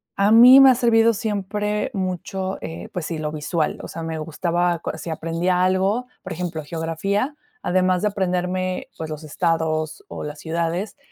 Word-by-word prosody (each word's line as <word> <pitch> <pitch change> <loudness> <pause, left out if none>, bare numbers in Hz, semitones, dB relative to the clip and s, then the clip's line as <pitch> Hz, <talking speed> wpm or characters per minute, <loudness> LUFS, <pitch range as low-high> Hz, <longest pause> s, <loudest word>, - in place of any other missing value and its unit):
a 200 +1 +3
mí 245 +4 +9
me 270 -1 +9
ha 255 - +5
servido 230 -1 +4
siempre 210 +2 -2
mucho, 190 0 -3
eh, 85 +1 -7
pues 175 -3 -3
sí, 165 - -3
lo 155 -1 -3
visual. 155 +1 -2
O - - -7
sea, 165 - -7
me 160 -1 -4
gustaba 170 +3 0
otros 165 -1 -5
c - - -9
si - - -4
aprendía 165 +3 0
algo, 190 +6 +1 0.2
por - - -8
ejemplo, 170 -2 -4
geografía, 170 - -2 0.3
además 185 0 +2
de 210 - +3
aprenderme, 185 -1 -2
pues, 160 - -6
los 155 0 -6
estados 160 - -1
o - - -7
las 150 0 -6
ciudades, 170 - -2
180 Hz, 180 wpm, -22 LUFS, 160-200 Hz, 0.3 s, mí